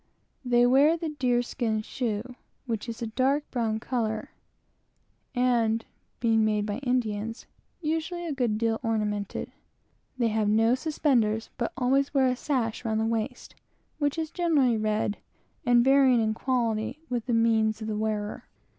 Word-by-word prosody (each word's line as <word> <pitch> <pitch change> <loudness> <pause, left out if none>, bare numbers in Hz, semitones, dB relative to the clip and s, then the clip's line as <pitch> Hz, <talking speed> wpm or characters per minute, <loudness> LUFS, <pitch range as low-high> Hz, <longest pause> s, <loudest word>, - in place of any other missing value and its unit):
They 245 -1 +4
wear 280 +6 +5
the 325 -1 -3
deer 250 -5 +1
skin 220 -3 -2
shoe, 240 0 -3 0.3
which 230 -1 -3
is 230 +1 -5
of 225 - -3
a - - -16
dark 270 +5 +2
brown 225 -3 -1
color, 220 -2 -2 1.0
and, 235 -3 +2 0.3
(being 225 -2 +3
made 210 -1 +1
by 210 +2 -3
Indians,) 230 -4 -2 0.4
usually 325 +2 -2
a 330 - -3
good 245 -6 0
deal 225 0 0
ornamented. 210 -3 -2 0.7
They 235 -2 +2
have 215 -1 +1
no 225 +2 +4
suspenders, 250 -6 +1
but 235 - -2
always 270 +3 +1
wear 270 -1 +4
a 255 -1 +2
sash 245 -5 -2
round 220 -2 0
the 220 - +1
waist, 230 +2 -3 0.5
which 290 +1 0
is 320 -1 -3
generally 300 -9 +2
red, 215 -1 -1 0.5
and 240 -1 +5
varying 265 -2 +5
in 220 -1 +1
quality 240 +3 -1
with 245 -3 -3
the 240 - 0
means 225 -1 +2
of 215 - -5
the 215 - -2
wearer. 210 -1 -3
235 Hz, 155 wpm, -27 LUFS, 220-260 Hz, 1.0 s, wear